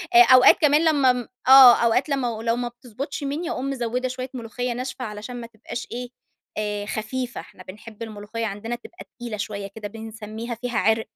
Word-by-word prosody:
آآ 240 - +10
أوقات 255 0 +7
كمان 300 +2 +4
لمّا 280 -5 +4
م 245 -2 -5 0.2
آه. 265 -2 +10
أوقات 250 +5 +2
لمّا 270 -3 0
و 220 -1 -5
لو 230 0 +1
ما 245 0 -2
بتضبطش 260 +5 -7
مِنّي، 305 +5 -3
أقوم 265 +2 -3
مزوّدة 250 -1 -2
شويّة 255 0 -5
ملوخيّة 245 0 -4
ناشفة 255 +1 -5
علشان 215 +3 -7
ما 230 - -8
تبقاش 230 +1 -8
إيه، 245 0 -5 0.5
آآ 210 -1 -2
خفيفة، 235 +4 -4
إحنا 185 - -15
بنحب 215 +4 -10
الملوخيّة 220 +1 -5
عندنا 220 +3 -4
تبقى 345 +9 -12
تقيلة 235 -3 -6
شويّة 200 -1 -4
كده 215 -2 -6
بنسميها 220 +1 -7
فيها 245 0 -4
عِرْق. 220 0 +1
240 Hz, 190 wpm, -23 LUFS, 220-255 Hz, 0.5 s, آآ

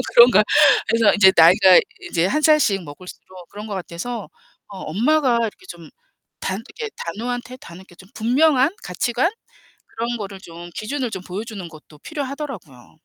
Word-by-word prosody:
그런가. 235 -3 +7 0.4
그래서 230 -1 +3
인제 190 -2 +6
나이가 180 +2 +7 0.3
이제 165 +1 0
1 305 +10 0
살씩 295 - +3
먹을수록 180 +3 -13
그런 210 +2 -9
것 205 - -5
같아서 190 +5 -6 0.4
어 195 - -10
엄마가 245 - +1
이렇게 230 - -5
좀 - - -11 0.5
단 190 +4 -3 0.2
이렇게 450 -1 -4
단호한 240 +8 -4
태 255 0 -11
다 170 - -13
이렇게 185 -1 -15
좀 190 +2 -17
분명한 265 +5 +2
가치관? 245 +7 -1 0.6
그런 235 +1 -4
거를 195 -2 -7
좀 175 -1 -11
기준을 250 +2 -3
좀 185 -1 -6
보여주는 195 0 -7
것도 155 -1 -16
필요하더라고요. 270 - -8
215 Hz, 340 characters per minute, -21 LUFS, 185-255 Hz, 0.6 s, 그런가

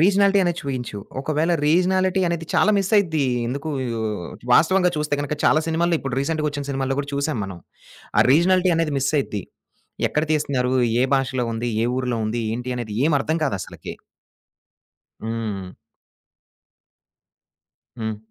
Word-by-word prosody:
Regionality 200 +2 +4
అనే 175 - +2
చూయించు. 125 -6 -4 0.2
ఒకవేళ 155 +4 0
regionality 185 +3 +3
అనేది 170 -1 -3
చాలా - - +4
మిస్సయిద్ది. 190 -7 +2 0.2
ఎందుకు? 140 +5 -4 0.9
వాస్తవంగా 180 +2 +4
చూస్తే 150 -1 0
గనుక 145 +1 -2
చాలా 155 - +5
సినిమాల్లో 165 +1 +1
ఇప్పుడు 135 -3 -4
రీసెంట్‌‌‌‌‌‌‌‌గా 150 +1 -1
ఒచ్చిన 145 -1 -5
సినిమాల్లో 135 -1 -1
గూడా 140 0 -3
చూసాం 140 -1 -1
మనం. 95 -2 -7 0.6
ఆ - - +8
రీజనాలిటీ 180 +3 +4
అనేది 160 -3 0
మిస్సయిద్ది. 135 -7 0 0.7
ఎక్కడ 150 +1 0
తీస్తున్నారు? 135 -4 0 0.3
ఏ - - +4
భాషలో 130 -2 0
ఉంది? 120 +1 -2
ఏ - - +2
ఊర్లో 125 -2 -1
ఉంది? 115 +2 -2
ఏంటి 125 +2 -3
అనేది 120 -3 -5
ఏమర్థం 155 +1 +1
కాదు 140 - 0
అసలకి. - - -8 1.3
హ్మ్. 110 -4 -3 2.3
హ్మ్. 110 -1 -2
145 Hz, 130 wpm, -22 LUFS, 125-165 Hz, 2.3 s, ఆ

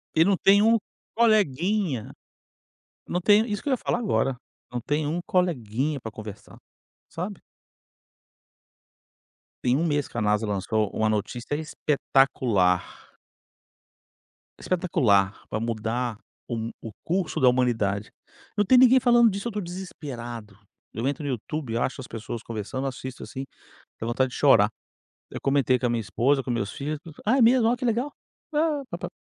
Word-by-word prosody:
E 160 - +6
não 200 -1 +4
tem 200 +1 +5
um 225 +1 +5 0.4
coleguinha, 200 - +2 1.0
não 180 - -1
tem 210 +4 +5
isso 205 -1 -2
que 285 - -3
eu - - +1
ia - - +1
falar 235 - -1
agora, 135 - +1 0.4
não 120 -1 -3
tem 145 +4 -1
um 165 +3 -1
coleguinha 145 - 0
para 115 -2 -7
conversar, 105 -1 -10 0.5
sabe 185 +3 -5 2.2
Tem 125 +2 +3
um 165 - +1
mês 145 -2 0
que - - -9
a - - 0
Nasa 105 +1 +1
lançou 105 +1 0
uma 110 - 0
notícia 115 +5 -2
espetacular. 135 - +1 1.5
Espetacular 130 - +2 0.2
para 110 - -2
mudar 115 +1 -2 0.3
o 120 - -3
mu 115 +1 -3
o 115 - -7
curso 180 0 -1
da 130 - +5
humanidade. 110 -5 0 0.5
Não 205 - +3
tem 250 +6 +6
ninguém 255 +1 +7
falando 240 -2 +5
disso, 200 +4 -4
eu - - -1
estou 210 0 -3
desesperado, 120 - -7 0.4
eu 115 +4 -2
entro 145 +1 -2
no 145 - -2
YouTube 130 +1 -4
e - - 0
acho 130 +2 -2
as - - -9
pessoas 115 0 -6
conversando, 115 +5 -4
assisto 130 0 -6
assim, 135 +1 -6 0.5
tenho 115 - -4
vontade 130 +2 +1
de - - -7
chorar, 115 -7 +5 0.6
eu - - -5
comentei 135 -3 +2
com 125 - -2
a - - +2
minha 120 -1 0
esposa, 125 +7 +1
com 125 - -3
meus 105 -4 -2
filhos, 145 +1 -4 0.3
ah 250 +6 +3
é - - +4
mesmo 235 0 +5
olha 240 +1 +2
que 250 - -4
legal, 240 +5 0 0.4
ah 300 -1 +1
pa - - -4
pa. - - -5
135 Hz, 165 wpm, -25 LUFS, 115-190 Hz, 2.2 s, ninguém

